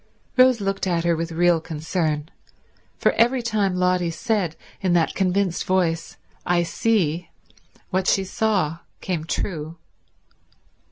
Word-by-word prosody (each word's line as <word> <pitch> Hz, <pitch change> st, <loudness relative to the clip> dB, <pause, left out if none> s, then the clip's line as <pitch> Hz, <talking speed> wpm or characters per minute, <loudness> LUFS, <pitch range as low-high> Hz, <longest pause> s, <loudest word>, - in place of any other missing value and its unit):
Rose 255 Hz, -2 st, +5 dB
looked 195 Hz, -1 st, -1 dB
at 170 Hz, -2 st, +1 dB
her 170 Hz, -1 st, +2 dB
with 165 Hz, +1 st, -3 dB
real 170 Hz, 0 st, +3 dB
concern: 155 Hz, -1 st, -2 dB, 0.7 s
for -, -, +3 dB
every 240 Hz, +2 st, +2 dB
time 210 Hz, -5 st, 0 dB
Lotty 180 Hz, -1 st, +1 dB
said 170 Hz, +1 st, -1 dB, 0.3 s
in 185 Hz, -2 st, +1 dB
that 170 Hz, -2 st, +2 dB
convinced 190 Hz, -1 st, 0 dB
voice, 170 Hz, -3 st, 0 dB, 0.3 s
"I 175 Hz, -1 st, +2 dB
see," 175 Hz, -4 st, 0 dB, 0.6 s
what 190 Hz, 0 st, 0 dB
she 195 Hz, -, +3 dB
saw 190 Hz, -5 st, 0 dB, 0.2 s
came 170 Hz, -4 st, -3 dB
true. 165 Hz, -2 st, -3 dB
180 Hz, 125 wpm, -23 LUFS, 165-195 Hz, 0.7 s, Rose